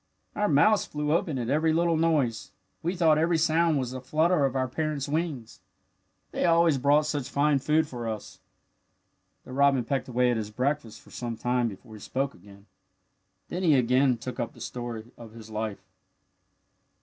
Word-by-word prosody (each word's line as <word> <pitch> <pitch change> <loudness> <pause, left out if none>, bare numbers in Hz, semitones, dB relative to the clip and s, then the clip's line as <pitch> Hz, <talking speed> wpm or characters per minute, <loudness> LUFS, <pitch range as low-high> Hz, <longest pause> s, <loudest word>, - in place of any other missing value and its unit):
Our 210 - +1
mouths 205 +8 +4
flew 150 0 -3
open 160 -3 0
at 120 0 -2
every 155 +2 +2
little 170 0 +2
noise. 155 -8 +1 0.3
We 175 +3 -2
thought 160 -3 +4
every 165 +1 +2
sound 160 0 +2
was 130 -2 -2
the 130 0 -6
flutter 155 +3 +2
of 135 -1 -2
our 130 -1 0
parents' 150 0 -3
wings. 150 -6 -3 0.7
They - - -2
always 165 -4 +4
brought 145 +3 +3
such 145 -4 -3
fine 145 0 +2
food 155 +3 +1
for 120 -4 -5
us." 110 -2 -7 1.0
The - - -12
robin 135 -2 +3
pecked 135 +2 -2
away 125 0 +2
at 120 - 0
his 105 -2 -4
breakfast 125 -1 -2
for - - -19
some 120 -2 -5
time 125 +1 0
before 110 +2 -10
he 105 - -10
spoke 135 +6 -2
again. 100 0 -17 0.8
Then 180 - -3
he 160 -5 +4
again 125 0 +3
took 120 +1 -7
up 120 - -3
the - - -16
story 120 -3 -6
of 115 -2 -11
his 110 -1 -12
life. 105 -2 -4
135 Hz, 180 wpm, -27 LUFS, 120-155 Hz, 1.0 s, mouths